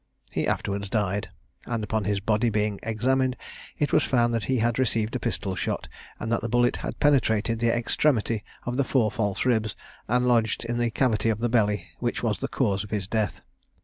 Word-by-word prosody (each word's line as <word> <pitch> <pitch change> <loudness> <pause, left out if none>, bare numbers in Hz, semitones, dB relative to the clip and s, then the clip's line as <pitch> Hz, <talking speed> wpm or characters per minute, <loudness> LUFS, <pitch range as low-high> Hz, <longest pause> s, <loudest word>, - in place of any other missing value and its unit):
He - - -1
afterwards 100 0 -1
died, 105 -2 -1 0.4
and 115 -2 -2
upon 110 -1 -1
his 100 0 +1
body 105 +3 +1
being 105 -1 0
examined, 130 +3 +1 0.4
it 145 - 0
was - - +6
found 120 -2 +2
that 115 -2 0
he 130 +1 +1
had 120 +1 +1
received 115 -2 0
a - - 0
pistol 100 -3 -2
shot, 85 - -2 0.3
and 115 - -3
that 115 - +1
the 115 - -3
bullet 120 +1 +3
had - - -5
penetrated 115 -6 +2
the 115 0 +3
extremity 115 -2 +1 0.2
of 120 +1 -2
the 140 - +3
four 120 -5 +2
false 105 -1 -1
ribs, 110 -4 +1 0.3
and 125 +2 +2
lodged 115 -2 +2
in 120 +1 -2
the 120 0 +2
cavity 115 -2 +1
of 110 - +1
the 120 +2 0
belly, 105 -3 +1
which - - -2
was - - 0
the - - -2
cause 100 0 0
of 105 - -10
his 105 -4 -2
death. 110 -2 -1
115 Hz, 205 wpm, -26 LUFS, 105-120 Hz, 0.4 s, was